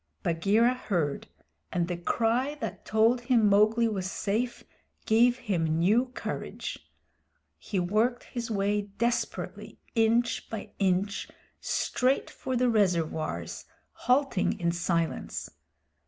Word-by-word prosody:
Bagheera 200 +8 +3
heard, 175 - -2 0.4
and 175 -1 0
the 175 - -2
cry 235 +10 0
that 300 - -6
told 225 +3 +3
him 240 -3 +3
Mowgli 215 +3 +4
was 190 -4 -2
safe 225 +6 -2 0.4
gave 240 +3 +4
him 170 -10 0
new 215 +10 +3
courage. - - -5 0.7
He 195 - -2
worked 215 +7 +1
his 235 -2 -5
way 205 -1 +1 0.2
desperately, 235 0 -2 0.2
inch 230 +1 +2
by 220 -2 -6
inch, 195 +1 0 0.3
straight 260 +2 0
for 260 - -4
the 250 +1 +2
reservoirs, 165 - 0 0.3
halting 255 -6 +1
in 170 -1 +1
silence. 170 -1 -2
215 Hz, 110 wpm, -28 LUFS, 180-240 Hz, 0.7 s, Mowgli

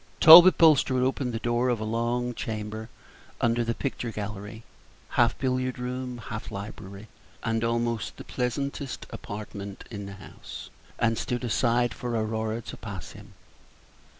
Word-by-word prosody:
Talbot 170 +4 +11
Bulstrode 140 -6 +5
opened 130 -1 0
the 115 - -2
door 120 +2 0
of 120 -3 0
a - - -3
long 120 +2 -1
chamber 110 0 -5 0.5
under 120 0 +2
the 115 0 -1
picture 130 -3 -3
gallery 105 +1 -6 0.5
half 120 -1 +2
billiard 130 -1 -1
room, 125 0 -4
half 110 -1 -7
library, 100 0 -8 0.4
and 115 0 0
almost 115 -1 -1
the - - -8
pleasantest 135 +2 -3
apartment 100 -1 -7
in 100 -2 -6
the 100 - -8
house 95 - -10 0.3
and 115 -1 +1
stood 125 0 -2
aside 120 0 +1
for 120 -1 -4
Aurora 110 +1 -2
to - - -8
pass 100 -6 -7
him. 105 -1 -14
115 Hz, 145 wpm, -27 LUFS, 110-125 Hz, 0.5 s, Talbot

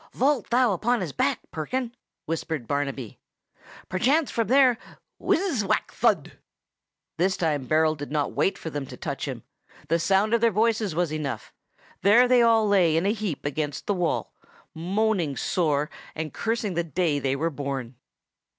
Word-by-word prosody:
"Vault 270 -2 +1
thou 245 -2 +3
upon 235 +5 0
his 170 -5 -3
back, 140 - 0
Perkin!" 235 +10 -3 0.3
whispered 160 -5 -3
Barnaby. 140 -5 -3 0.7
"Perchance 270 - +1
from 230 -1 0
there—" 255 -2 +5 0.4
Whizz! 330 - +1
whack! 195 - 0
thud!—This 185 +3 -3
time 150 -6 -1
Berold 155 -1 +2
did 145 - -6
not 150 -2 0
wait 195 - 0
for 160 - -6
them 145 -2 -4
to - - -10
touch - - -4
him: - - -6 0.5
the 165 - +2
sound 195 +5 +2
of 235 - +3
their 230 - +5
voices 215 -3 +1
was 170 -2 0
enough; 150 -3 -4 0.5
there 230 +5 +6
they 250 -1 +5
all 225 -2 +4
lay 180 -6 +4
again 165 - +1
in 200 - +3
a - - 0
heap 205 -11 -4
against 145 0 -3
the 205 - +1
wall, 180 -3 -1 0.4
moaning 180 - 0
sore 150 -4 0 0.3
and 155 -2 -4
cursing 225 -3 -1
the 170 0 0
day 165 -2 0
they 135 0 0
were 165 +4 -1
born. 135 -4 -4
180 Hz, 165 wpm, -25 LUFS, 150-225 Hz, 0.7 s, there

